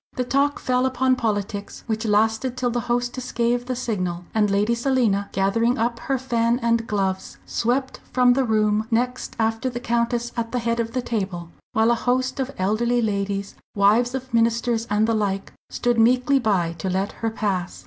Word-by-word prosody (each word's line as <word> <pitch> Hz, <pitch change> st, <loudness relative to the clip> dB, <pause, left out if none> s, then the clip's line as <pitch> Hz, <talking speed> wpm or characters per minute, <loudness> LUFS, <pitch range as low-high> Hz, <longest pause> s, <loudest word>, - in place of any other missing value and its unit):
The 250 Hz, -, 0 dB
talk 280 Hz, +3 st, +1 dB
fell 255 Hz, 0 st, +1 dB
upon 260 Hz, 0 st, +2 dB
politics, 205 Hz, -3 st, -3 dB
which 220 Hz, 0 st, -2 dB
lasted 220 Hz, +4 st, +1 dB
till 250 Hz, -1 st, 0 dB
the 240 Hz, -, 0 dB
hostess 245 Hz, +1 st, -1 dB
gave 240 Hz, +1 st, 0 dB
the 255 Hz, -, -1 dB
signal, 185 Hz, -8 st, -3 dB
and 210 Hz, -2 st, +2 dB
Lady 205 Hz, +4 st, +2 dB
Selina, 235 Hz, -5 st, +1 dB
gathering 230 Hz, +5 st, +1 dB
up 235 Hz, +1 st, -1 dB
her 270 Hz, +2 st, -1 dB
fan 235 Hz, -2 st, +1 dB
and 230 Hz, -1 st, +1 dB
gloves, 190 Hz, -2 st, -2 dB
swept 260 Hz, +3 st, -1 dB
from 250 Hz, -1 st, +5 dB
the 265 Hz, +1 st, +2 dB
room 215 Hz, -2 st, +1 dB
next 250 Hz, +2 st, -1 dB
after 225 Hz, +2 st, 0 dB
the 240 Hz, -1 st, -5 dB
Countess 235 Hz, 0 st, -1 dB
at 230 Hz, -1 st, -3 dB
the -, -, +1 dB
head 235 Hz, 0 st, -1 dB
of 230 Hz, 0 st, -2 dB
the 255 Hz, -1 st, -1 dB
table, 190 Hz, -7 st, -3 dB, 0.2 s
while 220 Hz, +2 st, +3 dB
a 235 Hz, -, -1 dB
host 255 Hz, +1 st, 0 dB
of 265 Hz, -1 st, -1 dB
elderly 225 Hz, +6 st, +1 dB
ladies, 200 Hz, -2 st, -1 dB, 0.2 s
wives 220 Hz, +5 st, +3 dB
of 260 Hz, -1 st, -6 dB
ministers 230 Hz, 0 st, +1 dB
and 210 Hz, +1 st, +2 dB
the 230 Hz, -, +1 dB
like, 200 Hz, -2 st, -1 dB, 0.2 s
stood 240 Hz, -1 st, 0 dB
meekly 250 Hz, +4 st, +4 dB
by 190 Hz, -8 st, +1 dB
to 190 Hz, -, -2 dB
let 190 Hz, +2 st, -1 dB
her 225 Hz, -, +1 dB
pass. 195 Hz, -5 st, -2 dB
230 Hz, 185 wpm, -23 LUFS, 210-245 Hz, 0.2 s, from